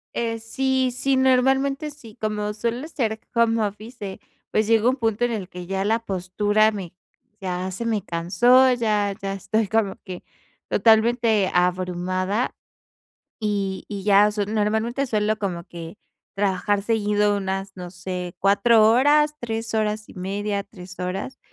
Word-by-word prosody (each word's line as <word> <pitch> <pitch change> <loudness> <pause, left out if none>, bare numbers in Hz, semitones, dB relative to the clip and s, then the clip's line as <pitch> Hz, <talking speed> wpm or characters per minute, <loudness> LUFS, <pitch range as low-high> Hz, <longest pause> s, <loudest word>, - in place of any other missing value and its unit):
Eh, 230 -1 -1
sí, 260 +3 0
sí, 270 +1 +1
normalmente 270 +3 +2
sí, 235 -7 -13
como 210 -1 -2
suele 235 +7 -3
ser 225 -9 -2 0.2
home 230 -1 +3
office, 215 +4 -7 0.2
eh, - - -14 0.3
pues, 215 0 +1
llega 225 +1 +4
un 260 - +1
punto 225 -2 0
en 240 - -1
el 200 -4 -4
que 180 0 -8
ya 195 +1 -1
la 225 +2 +2
postura 205 +2 +1
me 185 -5 -7 0.5
ya 185 -1 -3
se 190 +5 -5
me 220 -3 0
cansó, 240 +10 +4
ya 210 -4 0
ya 195 0 -3
estoy 200 +2 -1
como 215 -2 0
que 185 -2 -8 0.5
totalmente 225 -2 +3
abrumada, 185 +4 0 0.9
y 200 -3 -2
y 200 -2 -6
ya 205 0 +5
su 210 -1 -1
normalmente 220 +5 0
suelo 215 -2 0
como 180 -5 -4
que 170 +2 -9 0.4
trabajar 200 0 0
seguido 210 -1 +1
unas, 195 0 -3
no 180 -1 -8
sé, 180 -1 -6
4 215 +3 +5
horas, 295 +6 +4
3 225 -1 -4
horas 215 0 -1
y - - -13
media, 200 +2 -2
3 180 -3 -13
horas, 185 +8 -4
210 Hz, 150 wpm, -23 LUFS, 195-230 Hz, 0.9 s, ya